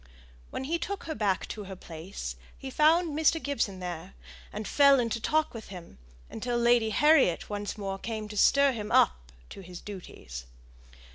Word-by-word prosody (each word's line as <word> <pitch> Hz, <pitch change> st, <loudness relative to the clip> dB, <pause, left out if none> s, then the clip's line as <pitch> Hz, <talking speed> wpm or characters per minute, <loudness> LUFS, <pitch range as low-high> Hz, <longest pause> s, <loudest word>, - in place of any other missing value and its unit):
When -, -, -4 dB
he 330 Hz, +5 st, -1 dB
took 400 Hz, +3 st, -4 dB
her 320 Hz, -, -4 dB
back 205 Hz, -6 st, 0 dB
to 210 Hz, -2 st, -6 dB
her 190 Hz, 0 st, -7 dB
place, 160 Hz, -, -7 dB, 0.2 s
he 265 Hz, -, -7 dB
found 315 Hz, +2 st, +3 dB
Mr. 320 Hz, +1 st, +3 dB
Gibson 230 Hz, -10 st, -2 dB
there, 180 Hz, 0 st, -6 dB, 0.4 s
and 210 Hz, 0 st, -5 dB
fell 280 Hz, -2 st, +6 dB
into 230 Hz, -1 st, -1 dB
talk 310 Hz, +5 st, +1 dB
with 225 Hz, -2 st, -8 dB
him, 175 Hz, -, -11 dB, 0.3 s
until 240 Hz, -, -3 dB
Lady 235 Hz, -1 st, +4 dB
Harriet 275 Hz, -, +3 dB
once 205 Hz, +1 st, -4 dB
more 195 Hz, -2 st, -4 dB
came 220 Hz, -1 st, -4 dB
to 210 Hz, -, -7 dB
stir 280 Hz, +6 st, +5 dB
him 215 Hz, -4 st, -5 dB
up -, -, +3 dB, 0.2 s
to -, -, -9 dB
his 180 Hz, -1 st, -9 dB
duties. 65 Hz, -, -9 dB
215 Hz, 170 wpm, -29 LUFS, 185-280 Hz, 0.4 s, fell